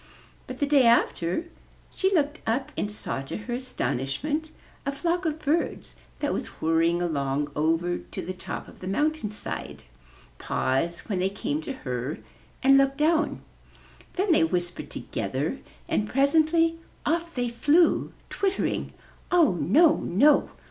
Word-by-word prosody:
But - - -6
the 290 - +1
day 280 -4 +5
after 230 - +2 0.5
she 380 0 +1
looked 305 -4 +1
up 235 +5 0
and 205 - -2
saw 210 -9 -4
to 135 - -5
her 225 +3 -5
aston 255 - -2
ishment 295 - -2 0.3
a 280 - -1
flock 345 +5 -1
of 310 -1 0
birds 315 +2 -1 0.3
that - - 0
was - - -3
whirring 165 +2 +2
along 145 -2 -1
over 165 +3 +1
to - - -7
the 185 - -4
top 185 - -6
of - - -15
the 185 - -7
mountain 295 +3 0
side, 210 - -6 0.6
pause 150 +7 -1
when 195 -4 -3
they 185 +1 +1
came 285 +10 -3
to 280 - -5
her, 125 +3 -3 0.5
and 275 +1 +7
look 275 0 +2
down. 315 +2 +1 0.7
Then 380 +1 +1
they 320 - +5
whispered 175 +1 -1
together - - -3 0.3
and 210 0 0
presently 320 +4 +3 0.3
off 335 +2 -1
they 245 -1 0
flew, 300 +8 +3 0.2
twittering, 390 -1 -1 0.4
''Oh, 335 - +5
no, 275 - +4
no! 280 - +3
260 Hz, 150 wpm, -26 LUFS, -, 0.7 s, and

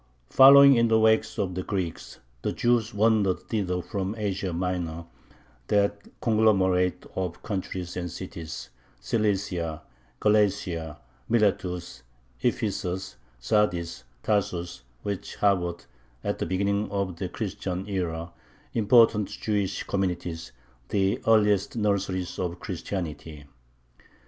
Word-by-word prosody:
Following 140 0 +9
in 115 0 +4
the 110 0 +4
wake 110 0 +4
of 95 -3 -1
the 95 - -2
Greeks, 90 -4 -4 0.2
the - - -1
Jews 120 -2 +1
wandered 105 -3 +2
thither 95 -2 -2
from 100 +3 -3
Asia 100 -3 -2
Minor, 85 -2 -3 0.6
that 100 0 +1
conglomerate 95 -5 +2
of 90 -3 -3
countries 95 -3 -4
and 90 -1 -3
cities 80 -6 -7 0.3
Cilicia, 95 -7 -1 0.4
Galatia, 95 -7 +1 0.3
Miletus, 90 - 0 0.4
Ephesus, 90 +1 -2 0.2
Sardis, 85 - 0 0.2
Tarsus 90 -7 -1 0.2
which 100 -2 -4
harbored, 90 -4 +1 0.4
at - - -2
the - - -2
beginning 100 +3 0
of 100 -3 -2
the 90 +1 -3
Christian 95 -2 -4
era, 85 -4 -3 0.4
important 115 -2 +4
Jewish 100 -3 -2
communities, 90 -4 -3 0.4
the 95 -1 +1
earliest 105 -2 +3
nurseries 100 -4 -1
of 90 -1 -3
Christianity. 85 -5 -5
95 Hz, 105 wpm, -26 LUFS, 90-105 Hz, 0.6 s, Following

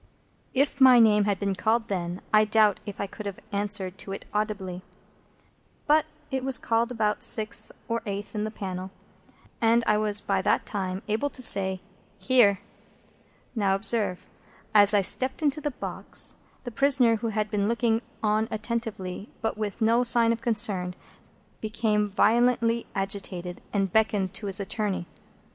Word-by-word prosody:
If 275 +1 +1
my 260 -2 +8
name 210 -3 +5
had 200 -2 0
been 200 -1 -1
called 225 +3 0
then, 180 -2 -3
I 215 0 +6
doubt 215 -1 +3
if 205 - -7
I - - -1
could 205 +1 -8
have 200 - -6
answered 200 -2 -2
to 195 - -5
it - - -8
audibly. 200 -4 -3 1.0
But 310 +1 +3 0.2
it 265 -1 -2
was 265 -1 +2
called 230 +1 0
about 215 -3 -1
sixth 215 -1 -1 0.2
or 230 0 -2
eighth 200 +2 -5
in 210 -1 -2
the 215 - -2
panel, 190 -3 -6 0.7
and 230 +1 +3
I 210 - +3
was 210 -1 +4
by 195 -2 -1
that - - +1
time 190 -1 -4
able 220 +7 -1
to 260 - -6
say, 190 -4 +3 0.4
"Here!" 215 -7 +3 0.9
Now, 200 -5 +1
observe. 205 -2 +2 0.5
As 205 0 +7
I 205 - +4
stepped 260 +9 +1
into 295 +1 +1
the 295 - -1
box, 265 - -2 0.3
the 245 - -6
prisoner, 255 -3 +3
who 230 - -3
had 215 -1 -2
been 205 -1 0
looking 230 0 +1 0.2
on 215 +1 +1
attentively, 215 -3 -4
but 225 - -2
with 210 -1 -5
no 230 +2 +3
sign 235 -1 +4
of 230 - -6
concern, 210 -6 0 0.6
became 215 -1 0
violently 235 +2 +2
agitated, 195 -2 -4
and 195 -3 -1
beckoned 210 -4 +1
to 205 - -5
his 195 +1 0
attorney. 200 -2 -3
215 Hz, 160 wpm, -26 LUFS, 195-230 Hz, 1.0 s, my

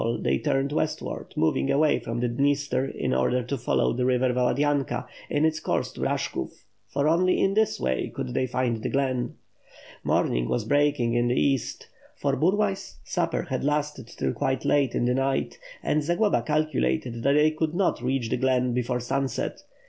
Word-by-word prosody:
they 65 0 +1
turned 135 +1 0
westward, 155 +1 -3
moving 80 +11 +1
away 145 +2 +3
from 115 +1 -4
the 125 - +1
Dniester 140 +1 +1
in 65 - -2
order 120 - +1
to 125 +4 -3
follow 125 -2 +1
the 125 - -1
river 125 0 +2
Valadynka 140 +2 +1 0.2
in 145 +2 +2
its 160 0 +1
course - - -1
to - - -9
Bash - - 0
kov; - - -6 0.2
for 145 +1 0
only 180 +3 +3
in 195 - +2
this 220 0 +2
way 65 0 -1
could 60 - -5
they 130 - 0
find 120 -2 -1
the - - -2
glen. 130 -3 -1 0.7
Morning - - +1
was 115 - 0
breaking 145 -3 +2
in 120 0 +2
the 125 - +1
east, 135 -3 0 0.3
for 140 -1 0
Burlay's 195 +4 0
supper - - -1
had - - -3
lasted 150 -3 -1
till - - -2
quite 135 -2 -1
late 140 -4 +2
in - - +1
the 125 - +2
night; 135 - -1 0.2
and 150 - +1
Zagloba 175 - +2
calculated 125 - 0
that 140 +3 +3
they 150 +1 +4
could 155 +1 -2
not 190 -9 +1
reach 125 -2 -1
the - - +1
glen 125 -1 +1
before 125 0 -1
sunset. 135 +2 -2
135 Hz, 180 wpm, -26 LUFS, 120-150 Hz, 0.7 s, they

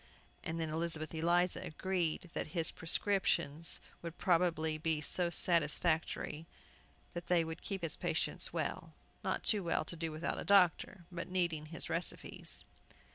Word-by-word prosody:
And 165 +1 -4
then 160 -1 -2
Elizabeth 160 -1 +2
Eliza 175 +2 +1
agreed 175 0 -2
that 155 - -4
his 165 -1 0
prescriptions 165 -3 0 0.2
would 170 -1 -7
probably 165 -3 +1
be 160 -1 0
so 170 +4 +6
satisfactory 165 -1 +1 0.7
that 175 0 -6
they 175 -2 +3
would 160 0 -6
keep 195 -3 -5
his 165 - +1
patients - - -1
well, - - -4 0.3
not - - -2
too 210 -3 +1
well 165 -2 0
to 170 - -8
do 165 -1 -3
without 155 +2 -3
a - - -4
doctor, 185 -1 +3
but 170 -1 -5
needing 170 -4 0
his 165 +2 -2
recipes. 170 +1 -3
165 Hz, 145 wpm, -34 LUFS, 160-175 Hz, 0.7 s, so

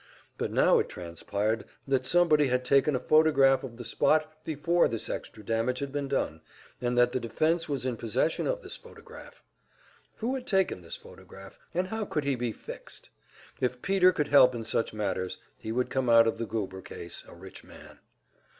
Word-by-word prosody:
But - - -3
now - - +4
it - - -1
transpired 100 +6 -3 0.2
that 130 -2 +1
somebody 155 -3 +4
had 125 0 0
taken 140 +2 +3
a - - 0
photograph 140 -4 +4
of 120 -3 -8
the 120 - -7
spot 155 +5 +2
before 165 +3 +2
this 115 -1 -3
extra 105 - -7
damage 115 +3 0
had 140 +1 -4
been 140 0 -2
done, 110 - -2 0.4
and 125 0 -1
that 120 0 +5
the 130 - -1
defense 155 +9 0
was 135 -3 -2
in 125 -3 -2
possession 120 +8 0
of - - -2
this - - -7
photograph. - - -14 0.7
Who 235 +4 -2
had 260 -2 -5
taken 190 - +1
this 85 -1 -7
photograph, 95 0 -14 0.2
and 185 +1 0
how 220 0 -3
could 150 -6 -2
he 140 0 +1
be 120 -2 -2
"fixed"? - - -10 0.5
If 125 -1 -2
Peter 190 -2 +4
could 150 -4 -2
help 130 -3 +6
in 115 -1 -5
such 115 - 0
matters, 95 -4 -3 0.2
he 110 - -5
would 125 +2 -1
come 130 -2 0
out 115 0 +7
of 115 - -1
the 115 - -3
Goober 95 -4 -4
case 85 -1 -8
a - - -13
rich 95 +2 -12
man. - - -15
125 Hz, 190 wpm, -28 LUFS, 115-155 Hz, 0.7 s, out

